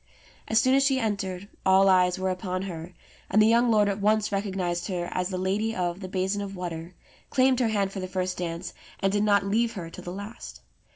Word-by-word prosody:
As 220 - +4
soon 255 - +3
as 275 - +5
she 270 -1 +2
entered 200 -4 -2 0.2
all 190 +1 +5
eyes 180 -1 +4
were 185 0 0
upon 185 0 -3
her; 175 -2 -7 0.3
and 205 - +3
the 215 - +7
young 235 +2 +4
lord 210 -2 +4
at 200 0 -2
once 215 +1 +2
recognized 190 -4 -2
her 175 -3 -2
as 180 0 -1
the 185 - -3
lady 205 +5 -1
of 175 0 -2
the 190 - -6
"Basin 190 +2 -1
of 195 -1 -6
Water," 175 -1 -6 0.3
claimed 260 -1 +3
her 245 - +2
hand 200 -3 0
for 195 - -5
the 185 - -4
first 185 0 -2
dance, 170 0 -4 0.3
and 195 - +1
did 205 - +2
not 205 -1 +3
leave 225 +3 +1
her 170 -5 -7
till - - -10
the 175 - -6
last. 205 +5 -8
195 Hz, 225 wpm, -26 LUFS, 180-210 Hz, 0.3 s, the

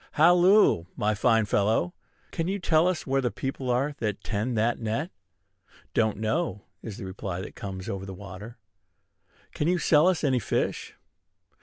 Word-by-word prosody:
"Halloo, 175 - +5
my 105 +1 +1
fine 115 +1 +3
fellow! 100 -3 +1 0.4
Can 165 - -2
you 195 +2 -1
tell 165 -2 +3
us 185 -3 -1
where 135 0 +1
the 125 - 0
people 135 +1 -4
are 130 +4 +1
that 105 -3 -3
tend 115 +3 -2
that 115 +2 +1
net?" 115 - -2 0.8
"Don't 110 -3 +1
know," 110 - -2 0.2
is 110 -4 -7
the - - -7
reply 95 -1 -5
that - - -8
comes 95 -1 -7
over 95 0 -5
the 95 - -7
water. 100 +4 -10 1.0
"Can 150 - -1
you 180 +1 +2
sell 155 -1 +4
us 185 -3 +1
any 130 -4 +2
fish?" - - -2
115 Hz, 165 wpm, -27 LUFS, 100-155 Hz, 1.0 s, Halloo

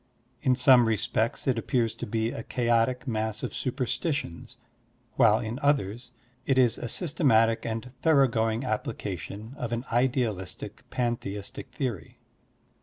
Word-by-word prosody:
In 130 - +3
some 125 -2 +6
respects 110 +1 0
it 125 -4 +1
appears 115 -2 0
to - - -6
be 110 +2 -1
a - - -5
chaotic 120 +2 +1
mass 110 -2 -2
of - - -3
superstitions, 130 - -3 0.6
while 110 -1 +5
in 115 +1 -4
others 125 -4 0 0.3
it 135 0 +1
is 125 -3 +4
a 120 - -4
systematic 115 -8 +2
and 115 +2 -4
thorough 145 -5 +5
going 115 0 0
application 105 - -4
of 120 - -3
an 120 +2 -2
idealistic 120 -6 -1
pantheistic 115 -5 -3
theory. 115 - -4
115 Hz, 130 wpm, -27 LUFS, 110-130 Hz, 0.6 s, some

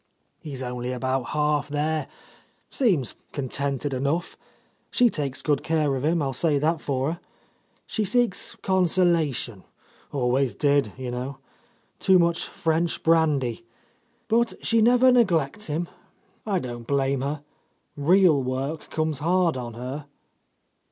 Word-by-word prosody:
"He's 135 -4 -6
only 125 0 -4
about 130 0 -1
half 150 0 0
there,.. 150 0 -1 0.6
seems 180 - +1 0.2
con 135 -3 -3
tented 140 +1 -2
enough.... 140 +7 -1 0.5
She 245 -2 +3
takes 140 -3 -3
good 145 -3 +1
care 155 -4 +1
of 130 - -3
him. 160 +1 +2
I'll 135 -1 -1
say 150 +3 +2
that 155 +3 0
for 135 +1 -1
her.... 170 - -10 0.7
She 220 - -1
seeks 230 0 0
consolation, 170 - +1 0.5
always 130 -1 +1
did, 140 -7 +2
you 130 -2 -5
know... 130 +2 -4 0.6
too 190 -1 +5
much 170 -1 +1
French 165 +1 -1
brandy... 145 -8 +2 0.6
but 235 +1 +2
she 230 -1 +3
never 250 +3 +5
neglects 205 - +2
him. 160 +3 -2 0.6
I 200 -3 +1
don't 120 -6 -6
blame 135 -1 +1
her. 145 +2 -3 0.5
Real 165 0 +4
work 135 +4 -3
comes 155 -2 -1
hard 170 +1 +2
on 120 -3 -6
her." 130 +5 -6
150 Hz, 130 wpm, -25 LUFS, 135-170 Hz, 0.7 s, too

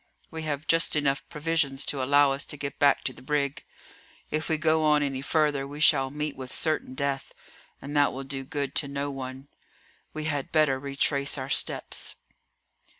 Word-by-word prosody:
We 160 - -5
have 150 -1 -3
just 165 0 +3
enough 140 -2 +1
provisions 150 -3 0
to 140 - 0
allow 145 +1 +5
us 140 - -1
to 150 - -4
get 140 -1 -5
back 140 -1 +4
to 130 - -1
the - - -14
brig. 140 0 -1 0.7
If 155 +1 -1
we 160 - +2
go 160 0 +3
on 150 -1 +4
any 135 -2 -2
further 145 -2 +1
we 145 +1 -8
shall 135 -4 +5
meet 150 +1 -3
with 130 -1 -7
certain 155 -5 +1
death, 140 0 -2 0.4
and 145 +1 -7
that 145 -1 +4
will 135 +1 -6
do 135 0 -4
good 140 0 -3
to 140 - +1
no 140 +1 -3
one. 135 0 -7 0.6
We 155 - -5
had 145 -3 -2
better 150 -4 +3
retrace 140 +1 0
our 130 0 -5
steps." - - -2
140 Hz, 185 wpm, -27 LUFS, 135-150 Hz, 0.7 s, allow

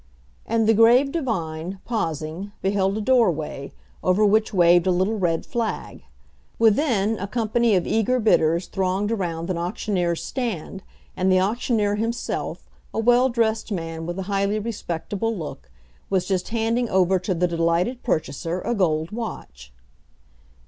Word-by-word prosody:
And 225 0 +1
the 225 - +5
grave 240 +5 +5
divine, 185 - -3
pausing, 170 - -3
beheld 195 +1 +1
a - - -2
doorway, 180 - +1 0.3
over 185 +4 +3
which 215 +1 +3
waved 175 -2 +4
a - - +4
little 190 +5 0
red 165 -3 0
flag. 230 -2 -4 0.6
Within, 225 -2 +2
a 200 - -3
company 230 0 +1
of 180 - +1
eager 225 +3 +1
bidders 170 -6 +3
thronged 195 +3 -1
around 175 -5 -2
an 170 - -2
auctioneer's 175 -1 -1
stand; 215 - -4 0.3
and 185 +1 +1
the 185 - +5
auctioneer 210 0 0
himself, 230 +2 -3 0.2
a - - -6
well 245 +3 +4
dressed 225 -2 0
man 165 -3 -4
with 175 +1 -4
a 190 - -3
highly 200 +2 0
respectable 210 0 -3
look, 160 -4 -7 0.4
was 185 -2 +1
just 185 -2 -1
handing 230 +1 0
over 185 0 +3
to 185 +1 -2
the 180 +1 +1
delighted 170 +8 0
purchaser 165 +3 -2
a 240 - -1
gold 160 -6 0
watch. 65 - -7
195 Hz, 145 wpm, -23 LUFS, 175-225 Hz, 0.6 s, the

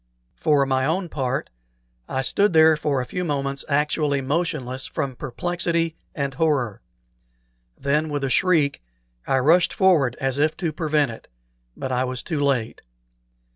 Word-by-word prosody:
For 145 -3 +2
my 130 -1 +1
own 175 +3 -1
part, 135 -3 -2 0.6
I 130 - -1
stood 190 +5 +2 0.2
for 145 -3 0
a - - -4
few 180 +8 -4
moments 140 -3 -2
actually 150 0 +1
motionless 135 -3 -2
from 135 -2 -3
perplexity 165 +4 -2 0.2
and 140 -2 -2
horror; 135 -8 0 1.0
then, 150 +3 0
with 145 -1 -2
a 135 - 0
shriek, 160 - +2 0.5
I 135 - +2
rushed 165 +7 +4
forward 155 -10 +3
as 135 0 -1
if 155 +1 +1
to 170 -4 -2
prevent 150 -4 +1
it; 115 - -12 0.5
but 130 - -4
I 125 +1 +1
was 125 -1 -4
too 160 -4 -3
late. 135 -6 0
145 Hz, 145 wpm, -23 LUFS, 135-160 Hz, 1.0 s, rushed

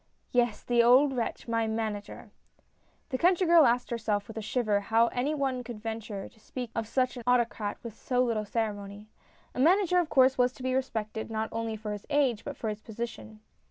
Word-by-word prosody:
" - - -43
Yes, 240 -3 +1
the 240 -1 +3
old 260 +4 +5
wretch, 235 0 -3
my 230 -1 0
Manager! 220 -2 -4 0.4
" - - -40
The 255 - -1
country 365 +1 +3
girl 335 -3 +7
asked 245 +1 0
herself, 210 -3 -1
with 225 - -9
a 220 - -4
shiver, 215 -2 0
how 225 +3 +2
any 270 +5 -1
one 265 -3 -1
could 240 -3 -8
venture 220 -2 -5
to 225 - -21
speak 245 +1 -7
of 225 -1 -3
such 255 +2 0
an 240 - -7
autocrat 235 -4 +1
with 230 -3 -7
so 250 +2 0
little 230 -3 0
ceremony. 205 -1 -4 0.4
A - - -6
Manager 360 +4 +4
of 340 -3 -1
course 260 -1 +4
was 250 0 +3
to 255 - -11
be 260 0 0
respected, 220 -4 -3
not 220 0 -2
only 225 -1 -3
for 215 0 -6
his 205 - -8
age, 275 -7 +1
but - - -6
for 220 - -3
his 210 0 -5
position. 220 -1 -7
235 Hz, 210 wpm, -29 LUFS, 220-255 Hz, 0.4 s, girl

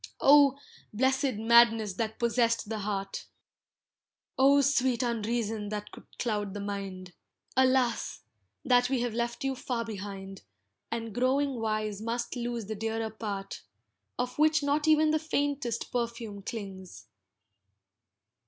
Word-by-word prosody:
Oh! 280 -1 +6 0.3
blessed 265 +3 +1
madness 225 -1 +5
that 220 +2 -3
possessed 230 -2 +1
the 220 -1 -3
heart, 195 -1 -4 1.1
Oh! 280 +2 +5
sweet 260 -3 +2
unreason 225 -2 -1
that 210 0 -5
could - - -13
cloud 210 -4 -2
the - - -4
mind, 195 -3 -5 0.4
Alas! 255 -2 +2 0.4
that 245 -1 +4
we 265 -3 +1
have 240 -2 -1
left 235 +2 -2
you 270 0 0
far 245 -2 -3
behind, 195 -2 -7 0.5
And 230 -2 -4
growing 265 +4 +1
wise 215 -2 -2
must 235 +2 -3
lose 240 -2 -3
the 220 - -4
dearer 225 +1 -3
part, 205 -3 -5 0.6
Of 250 +2 -3
which 310 0 +4
not 295 +2 +1
even 310 0 +5
the 310 - +2
faintest 285 -6 -2
perfume 235 -4 -3
clings. 190 - -7
230 Hz, 125 wpm, -29 LUFS, 210-260 Hz, 1.1 s, Oh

